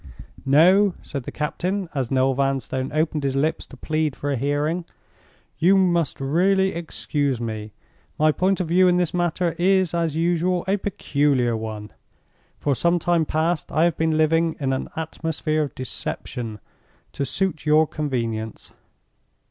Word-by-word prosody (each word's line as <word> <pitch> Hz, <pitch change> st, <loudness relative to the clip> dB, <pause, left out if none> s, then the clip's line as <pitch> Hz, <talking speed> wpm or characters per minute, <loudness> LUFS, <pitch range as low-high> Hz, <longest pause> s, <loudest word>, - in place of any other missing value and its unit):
"No!" 180 Hz, +7 st, +5 dB
said 140 Hz, -4 st, -6 dB
the -, -, -5 dB
captain, 180 Hz, +5 st, -2 dB
as 135 Hz, -5 st, -2 dB
Noel 130 Hz, 0 st, +2 dB
Vanstone 135 Hz, -1 st, -1 dB
opened 155 Hz, 0 st, 0 dB
his 135 Hz, -1 st, 0 dB
lips 150 Hz, +4 st, 0 dB
to 135 Hz, -, -13 dB
plead 155 Hz, 0 st, -1 dB
for 145 Hz, -, -3 dB
a -, -, +1 dB
hearing, 145 Hz, +6 st, -1 dB, 0.8 s
"you 190 Hz, +4 st, +5 dB
must 175 Hz, -5 st, +1 dB
really 190 Hz, +7 st, +2 dB
excuse 145 Hz, -5 st, -2 dB
me. 110 Hz, -2 st, -5 dB, 0.5 s
My 155 Hz, 0 st, +4 dB
point 190 Hz, +5 st, +1 dB
of 180 Hz, -, -1 dB
view 185 Hz, +3 st, +4 dB
in 180 Hz, 0 st, +4 dB
this 180 Hz, -2 st, 0 dB
matter 175 Hz, -1 st, 0 dB
is, 185 Hz, -1 st, +3 dB
as 165 Hz, -3 st, 0 dB
usual, 175 Hz, +2 st, +1 dB
a 195 Hz, +2 st, +2 dB
peculiar 140 Hz, -, 0 dB
one. 110 Hz, -1 st, -6 dB, 0.7 s
For 145 Hz, -, 0 dB
some 170 Hz, +6 st, +2 dB
time 170 Hz, -1 st, +1 dB
past 160 Hz, +2 st, -1 dB
I 155 Hz, -, +2 dB
have 170 Hz, -3 st, +2 dB
been 160 Hz, -1 st, +1 dB
living 165 Hz, +1 st, +2 dB
in 135 Hz, -2 st, 0 dB
an 130 Hz, -, -3 dB
atmosphere 160 Hz, -1 st, -2 dB
of 145 Hz, -, -3 dB
deception, 120 Hz, -3 st, -4 dB, 0.6 s
to 140 Hz, -, -2 dB
suit 160 Hz, +3 st, -2 dB
your 155 Hz, +1 st, +5 dB
convenience. 115 Hz, -8 st, -4 dB
155 Hz, 155 wpm, -23 LUFS, 135-175 Hz, 0.8 s, No